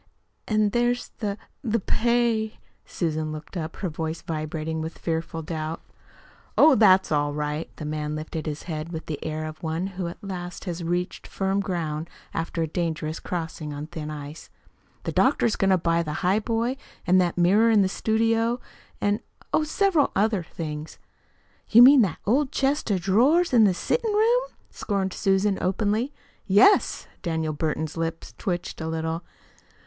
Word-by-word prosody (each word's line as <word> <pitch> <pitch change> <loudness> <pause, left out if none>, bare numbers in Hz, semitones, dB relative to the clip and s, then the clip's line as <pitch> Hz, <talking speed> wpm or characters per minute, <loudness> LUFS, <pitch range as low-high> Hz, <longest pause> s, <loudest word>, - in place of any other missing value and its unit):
"An' 215 -1 +2
there's 240 +1 +1
the 205 -3 -2 0.3
the 230 -2 +1
pay." 230 0 +1 0.3
Susan 155 -2 -2
looked 155 +4 -8
up, 165 -2 -4
her 190 - -3
voice 160 0 -4
vibrating 155 0 -3
with 160 +1 -5
fearful 165 0 -3
doubts. 155 0 -4 0.7
"Oh, 310 - +8
that's 195 -7 +5
all 145 -1 +1
right." 150 +1 -2
The 155 - -7
man 150 0 -3
lifted 155 +1 -5
his 150 0 -4
head 160 -1 -5
with 160 -1 -5
the 150 -3 -5
air 155 0 -3
of 155 0 -8
one 160 +2 -2 0.2
who 175 - -1
at 170 - -9
last 180 -2 -6
has 175 -2 -4
reached 175 +2 -2
firm 195 0 -1
ground 165 -4 -3 0.2
after 165 0 -2
a - - -1
dangerous 160 -1 -2
crossing 160 -4 -4
on 145 +1 -5
thin 155 -1 -6
ice. 150 +1 -8 0.5
"The - - -2
doctor's 230 - +3
going 195 - +2
to 190 - +5
buy 170 0 +1
the 155 -1 -4
highboy 225 +6 +1 0.3
and 185 +1 +5
that 175 -1 0
mirror 200 +6 +5
in 215 -3 +5
the - - +2
studio, 225 +4 +1 0.4
and 205 +1 +1 0.3
oh, 315 - +4
several 325 0 +2
other 210 -1 +2
things." 155 -2 -6 0.7
"You 235 +2 +9
mean 270 +1 +9
that 185 -7 +1
old 260 +6 +2
chest 275 -1 0
of 190 -3 +1
drawers 260 - +3
in 225 -3 +7
the 195 - +4
settin' 455 - 0
room?" 470 +4 +3 0.3
scorned 195 -3 -2
Susan 195 0 +1
openly. 215 +7 0 0.4
"Yes." 205 - +5 0.2
Daniel 160 -3 -1
Burton's 155 +1 -2
lips 165 0 -3
twitched 175 -3 -3
a 160 - -3
little. 160 +1 -2
175 Hz, 165 wpm, -25 LUFS, 160-220 Hz, 0.7 s, You